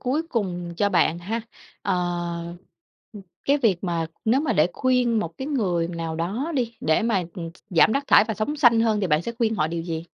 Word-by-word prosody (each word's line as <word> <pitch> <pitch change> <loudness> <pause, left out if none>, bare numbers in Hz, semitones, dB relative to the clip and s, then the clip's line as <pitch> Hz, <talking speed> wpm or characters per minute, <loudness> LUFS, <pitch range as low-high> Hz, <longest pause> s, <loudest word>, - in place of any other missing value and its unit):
cuối 275 +5 0
cùng 180 - -3
cho 205 +2 +2
bạn 170 -3 +2
ha, 220 +7 -3 0.4
ờ, 175 -2 -2 0.9
cái 285 +1 +3
việc 205 -8 +1
mà 170 -2 -1 0.2
nếu 245 +5 +3
mà 295 -6 0
để 165 -4 +3
khuyên 250 -3 +2
một 170 -6 -3
cái 265 - -4
người 180 - 0
nào 165 -2 -4
đó 210 - -2
đi, 235 -2 -1
để 160 +8 +2
mà 220 -5 +1 0.5
giảm 180 +5 +5
rác 280 0 -1
thải - - +6
và 220 - -1
sống 290 +8 -2
xanh 240 -5 +5
hơn 220 -2 +2
thì 190 - +1
bạn 155 0 +2
sẽ 235 - -4
khuyên 225 -2 0
họ 155 - +1
điều 165 +1 -3
gì? 165 -1 -4
205 Hz, 205 wpm, -24 LUFS, 170-235 Hz, 0.9 s, thải